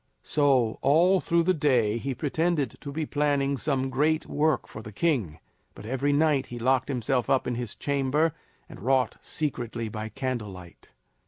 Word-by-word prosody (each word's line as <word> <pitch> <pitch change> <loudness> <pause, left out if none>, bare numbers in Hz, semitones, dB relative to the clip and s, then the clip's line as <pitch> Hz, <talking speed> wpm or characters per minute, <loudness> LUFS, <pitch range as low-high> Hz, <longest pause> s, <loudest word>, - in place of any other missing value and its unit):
So, 135 -6 +2
all 175 +7 +4
through 170 -1 +1
the 185 +2 +3
day 125 -8 +2
he 135 +2 -3
pretended 150 -1 0
to 140 - -6
be 155 +2 -2
planning 145 -1 +1
some 135 -1 -1
great 155 +4 +1
work 155 -1 0
for 110 - -9
the 110 - -9
king, 110 - 0 0.4
but - - -11
every 135 +4 0
night 145 -2 +2
he 120 - -7
locked 130 +1 +1
himself 125 -1 0
up 130 - +2
in 125 - -1
his 120 -2 -4
chamber 145 +3 0 0.3
and - - -12
wrought 130 +2 +1
secretly 120 -6 -3
by 110 +1 -5
candle 125 -2 -3
light. 90 -2 -13
135 Hz, 170 wpm, -27 LUFS, 120-150 Hz, 0.4 s, all